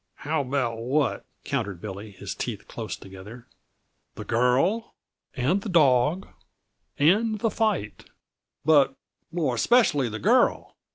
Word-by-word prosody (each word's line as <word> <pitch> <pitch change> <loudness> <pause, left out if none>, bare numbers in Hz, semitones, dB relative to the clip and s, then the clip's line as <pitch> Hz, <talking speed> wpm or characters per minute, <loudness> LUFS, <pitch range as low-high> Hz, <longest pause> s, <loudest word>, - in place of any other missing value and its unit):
"How 155 +1 0
about 125 -4 -2
what?" 135 +5 0 0.2
countered 110 -10 -3
Billy, 100 +2 -7
his 100 - -7
teeth - - -5
close - - -6
together. 100 +5 -12 0.7
"The - - -7
girl, 130 - +1 0.4
and 150 +9 +1
the 215 - -6
dawg, 150 +1 +3 0.7
and 215 +9 +3
the 225 +1 0
fight 210 - -1 0.6
but 145 -3 +4 0.4
more 165 -7 0
especially 145 - +3
the 110 - -5
girl. - - +2
135 Hz, 120 wpm, -25 LUFS, 115-175 Hz, 0.7 s, but